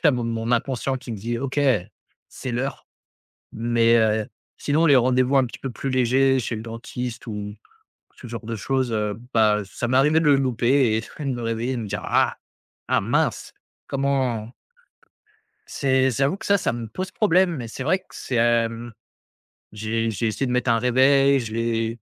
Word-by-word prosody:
il - - -21
y - - +7
a - - +7
mon 120 -3 -2
mon 115 0 -3
inconscient 130 +2 0
qui 125 -2 -8
me - - -4
dit: 115 +4 -3
«OK, 135 +2 -3 0.7
c'est 130 - -6
l'heure». 130 +4 -3 0.7
Mais, 115 0 +2
heu, 110 -1 +2 0.3
sinon, 150 +3 +1
les 145 -4 +6
rendez-vous 130 +1 +3
un 130 - +4
petit 120 - -9
peu 135 - -4
plus 135 +4 -4
légers, 130 +1 +3
chez 115 0 -3
le 110 - -6
dentiste 120 +2 -6
ou 110 - -4
ou 105 0 -6 0.6
ce - - -11
genre 115 -1 -7
de 115 0 -4
choses, 130 +2 -1
heu, 105 -1 -1 0.2
bah, 105 -2 +3
ça 120 - -4
m'est 130 +2 +2
arrivé 150 +4 +4
de 165 - -1
le 145 - +6
louper 130 -2 +2
et 110 - 0 0.2
de - - -5
me 120 - -5
réveiller 115 +3 -2
de 120 - -3
me 110 - -5
dire: 105 +1 -4
«Ah, - - +2 0.5
ah - - +2
mince!», - - -1 0.3
comment 130 -5 -1 1.1
c'est 130 -1 +1
j'avoue 135 - 0
que 220 - -9
ça, 200 0 +4
ça - - -1
me 115 -1 -5
pose 185 - -5
problème 185 -4 +2
mais 120 - -5
c'est 115 - -6
vrai 175 +7 +2
que - - -31
c'est, 130 - -5
hem, 115 0 +1 0.8
j'ai 115 +2 -2
j'ai 110 +2 -2
essayé 120 +5 -2
de 125 - -2
mettre 125 0 +1
un 115 - +3
réveil 135 +3 +4
je 110 -3 -6
l'ai 115 0 -1
120 Hz, 200 wpm, -23 LUFS, 115-135 Hz, 1.1 s, y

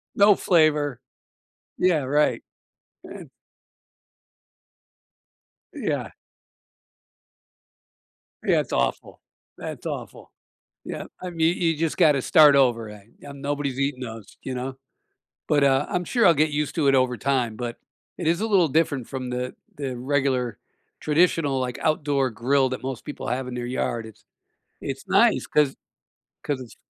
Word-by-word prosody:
No 205 0 +6
flavor. 150 - +2 0.8
Yeah, 175 -5 +3
right, 145 +3 +1 0.6
and - - -10 2.4
Yeah. - - -2 2.4
Yeah, - - +4
it's - - -4
awful, - - -1 0.4
that's - - -7
awful, - - -6 0.5
yeah. - - -5 0.2
I 180 - -4
mean, 165 0 +1
you 165 -2 +2
just 160 +1 -2
gotta 145 -4 +4
start 150 0 +6
over 120 -5 +3
again, 105 +1 -14
um, 140 -1 -10
nobody's 140 -2 -2
eating 140 -2 -1
those, 110 -4 -8
you 130 - -4
know, 130 +1 -5 0.7
but, 145 -1 +3
uh, 135 +1 +3
I'm 180 - -1
sure 235 +3 +2
I'll 170 - +7
get 155 +1 +2
used 150 0 -2
to 150 -4 +1
it 135 - +5
over 130 -1 +2
time, 125 -2 0
but 120 0 -5 0.4
it 175 - -3
is 170 +4 +2
a 220 - 0
little 190 -6 +4
different 145 -4 0
from 130 -2 -5
the 125 +1 -4 0.2
the 135 -3 -4
regular 130 -3 0 0.4
traditional, 155 -3 +2
like, 125 -1 -3
outdoor 145 -4 +1
grill 130 +5 +1
that 130 0 -5
most 130 -2 -5
people 150 - -6
have 130 +1 -2
in 125 - -6
their 120 0 -4
yard, 120 -2 -2
it's 110 -2 -15 0.6
it's - - -6
nice - - +4
'cause 150 -3 +2 0.7
'cause 140 -3 -2
it's 125 - -11
140 Hz, 145 wpm, -24 LUFS, 125-150 Hz, 2.4 s, I'll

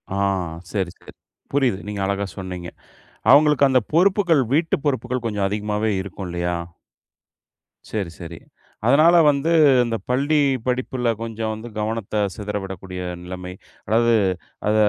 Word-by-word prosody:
ஆ - - -1 0.5
சரி, 95 -4 -1
சரி. - - -15 0.4
புரியுது. 130 -9 +2
நீங்க 105 -1 -4
அழகா 100 +1 -1
சொன்னீங்க. 90 -2 -6 0.6
அவுங்களுக்கு 145 -1 +6
அந்த 130 -1 +4
பொறுப்புகள் 175 -4 +4
வீட்டு 160 +2 +2
பொறுப்புகள் 125 -3 -1
கொஞ்சம் 105 -3 0
அதிகமாவே 105 +1 -1
இருக்கும் 95 0 -7
இல்லயா! 85 0 -2 1.4
சரி, 100 -6 -2
சரி. 85 -1 -8 0.5
அதனால 155 +6 +6
வந்து, 145 +3 +1 0.3
இந்த 115 -1 -2
பள்ளி 140 +4 +2 0.3
படிப்பில 125 -1 0
கொஞ்சம் 110 -1 -3
வந்து 110 +2 -8
கவனத்த 105 -1 -1
சிதற 105 -1 -4
விடக்கூடிய 95 -1 -7 0.2
நிலைமை 90 0 -7 0.3
அதாவது 115 +2 +3 0.6
அத 105 - +2
110 Hz, 125 wpm, -22 LUFS, 95-135 Hz, 1.4 s, அவுங்களுக்கு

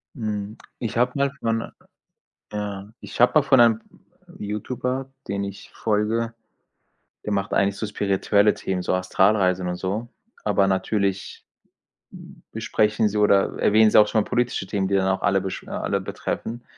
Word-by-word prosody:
Mhm, 105 -3 -4 0.2
ich 115 -1 -3
habe 125 +1 +3
mal 140 -1 +1
von 115 0 -1 0.8
ja, 105 -1 -5
ich - - -8
habe 125 - +6
mal 155 - +7
von 135 -2 +4
einem 115 -2 +5 0.6
YouTuber, 125 +5 -3 0.2
den 100 0 -2
ich 100 0 -8
folge 110 +2 -1 0.9
Der 105 - -2
macht 100 0 -1
eigentlich 100 0 +2
so 110 - -3
spirituelle 100 +1 +2
Themen, 95 -1 -3
so - - -1
Astralreisen 90 0 +2
und 90 - -2
so. 100 +6 -3 0.4
Aber 100 -2 +2
natürlich 100 0 -1 1.1
besprechen 105 0 +1
sie 105 - -3
oder 100 -2 +3
erwähnen 110 +1 +5
sie - - +7
auch 105 - +6
schon 110 0 +2
mal - - -7
politische 120 -5 0
Themen, 95 -1 -1
die 100 - -2
dann 95 -1 +2
auch 95 0 0
alle 95 +1 +2
besch 95 0 -5
äh, - - -13
alle - - -2
betreffen. 120 +2 -5
105 Hz, 160 wpm, -23 LUFS, 95-115 Hz, 1.1 s, mal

